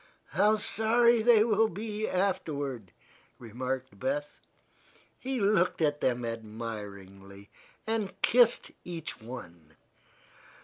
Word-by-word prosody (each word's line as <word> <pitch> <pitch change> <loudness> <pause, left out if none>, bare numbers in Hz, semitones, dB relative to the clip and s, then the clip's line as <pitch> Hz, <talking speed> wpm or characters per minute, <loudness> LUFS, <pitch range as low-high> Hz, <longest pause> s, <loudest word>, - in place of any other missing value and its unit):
"How 205 +7 +3
sorry 225 +2 +3
they 225 -1 +6
will 220 -1 +3
be, 215 +3 -4
afterward," 145 - -2 0.5
remarked 125 +3 -5
Beth. 290 +2 -3 0.8
He 260 0 -3
looked 195 -3 +2
at 150 -2 +1
them 125 -1 0
admiringly, 105 -3 -8 0.3
and 220 -3 -2
kissed 240 -1 +4
each 165 -8 -7
one. 85 -10 -10
165 Hz, 95 wpm, -29 LUFS, -, 0.8 s, they